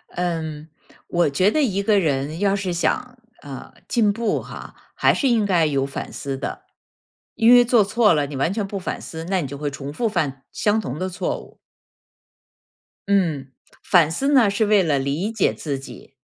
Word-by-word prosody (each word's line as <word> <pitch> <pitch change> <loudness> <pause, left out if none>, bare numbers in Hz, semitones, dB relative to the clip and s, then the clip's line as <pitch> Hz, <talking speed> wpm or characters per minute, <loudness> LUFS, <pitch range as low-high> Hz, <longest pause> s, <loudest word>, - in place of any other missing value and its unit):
嗯， 160 -3 -3 0.4
我 175 -3 +2
觉 185 +9 +2
得 310 - +1
一 200 -6 0
个 205 0 +3
人 150 -1 -1
要 200 0 +2
是 195 -2 -2
想 250 +8 -1 0.2
呃， 140 -3 -9
进 220 -4 +2
步 225 0 -1
哈， - - -10 0.2
还 - - +3
是 275 - 0
应 230 -4 +2
该 175 -5 +3
有 140 -3 0
反 140 - -6
思 135 -1 -5
的。 135 - -6 0.7
因 230 +2 +6
为 245 0 +8
做 240 -2 +4
错 210 0 +3
了， 150 -2 +1
你 145 - -7
完 140 +6 0
全 210 -1 -2
不 195 0 -5
反 180 - -4
思， 160 0 -8
那 190 -2 +1
你 145 - -4
就 140 +2 -7
会 145 -1 -2
重 140 0 -7
复 230 +7 -1
犯 145 -9 -2
相 215 +1 +1
同 135 -8 -5
的 185 - -2
错 185 - -3
误。 - - -16 1.5
嗯， 165 -9 +1 0.4
反 165 -4 +4
思 275 - 0
呢 245 -7 +5
是 205 +2 +1
为 205 -2 +4
了 150 -5 +1
理 145 +10 -2
解 220 -4 +1
自 140 -4 -4
己。 135 - -12
180 Hz, 205 characters per minute, -22 LUFS, 145-210 Hz, 1.5 s, 为